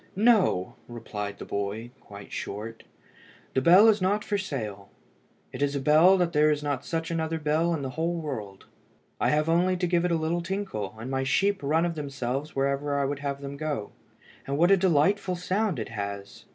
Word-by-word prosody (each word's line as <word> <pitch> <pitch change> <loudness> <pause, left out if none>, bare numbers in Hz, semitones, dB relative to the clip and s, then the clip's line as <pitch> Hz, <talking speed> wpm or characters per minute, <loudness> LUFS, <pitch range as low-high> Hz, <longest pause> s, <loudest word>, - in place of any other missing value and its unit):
"No," 200 - +3
replied 105 -4 -6
the - - -8
boy, 100 +4 -4
quite 100 0 -12
short; 110 +3 -6 0.7
"the 130 - +2
bell 185 +9 +7
is 215 -3 +4
not 205 +3 +1
for 205 - -1
sale. 110 - -4 0.6
It - - -7
is 145 0 +1
a - - 0
bell 155 +7 +5
that 175 -2 0
there 150 0 +4
is 150 -1 0
not 145 -2 -2
such 165 +1 -3
another 165 -1 -1
bell 160 +2 +1
in 145 - -4
the 130 - -4
whole 165 +5 -1
world. 105 -11 -6 0.5
I - - +2
have 150 +1 +2
only 180 +3 +2
to 180 - 0
give 175 -1 +1
it 180 - +1
a - - +3
little 160 +2 -1
tinkle, 170 - -4
and 120 +4 -6
my 135 0 0
sheep 195 +9 +1
run 155 +4 +2
of 170 - -1
themselves 140 -1 -4
wherever 140 +1 0
I 140 - +1
would 140 +1 -3
have 140 -1 -4
them 140 0 -6
go. 145 -8 -3 0.6
And 140 +1 -1
what 175 +4 +4
a - - +8
delightful 185 +2 +2
sound 185 +1 -1
it 110 - -4
has! 100 -2 -6
150 Hz, 200 wpm, -27 LUFS, 130-175 Hz, 0.7 s, a